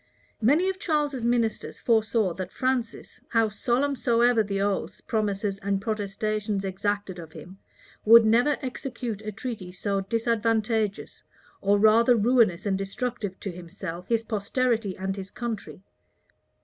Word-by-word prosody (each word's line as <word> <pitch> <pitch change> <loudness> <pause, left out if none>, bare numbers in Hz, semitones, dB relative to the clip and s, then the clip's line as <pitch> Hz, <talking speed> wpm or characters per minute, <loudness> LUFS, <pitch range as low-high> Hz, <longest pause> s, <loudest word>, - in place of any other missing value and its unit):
Many 295 - +4
of 380 -1 -2
Charles's 295 - 0
ministers 235 -2 0
foresaw 220 -4 +2
that 185 +1 -6
Francis, 255 -3 -2
how 225 -2 +2
solemn 250 +6 0
soever 240 -2 +3
the 200 -2 -2
oaths, 200 -1 -1
promises, 205 -2 -2
and 200 -1 -1
protestations 210 0 -2
exacted 195 -1 -2
of 160 -2 -10
him, 190 +2 -11 0.4
never 230 +3 +6
would 295 - 0
execute 250 -4 -5
a 215 0 -5
treaty 215 -4 -6
so 195 +2 -2
disadvantageous, 225 0 -1 0.4
or 200 +1 +3
rather 225 +4 +5
ruinous 220 -5 +3
and 195 -1 0
destructive, 205 0 -4
to 195 - -4
himself, 180 0 -8
his 230 -1 +1
posterity, 220 -1 -1
and 190 0 -3
his 190 0 -6
country. 225 -5 -6
215 Hz, 135 wpm, -26 LUFS, 195-235 Hz, 0.4 s, never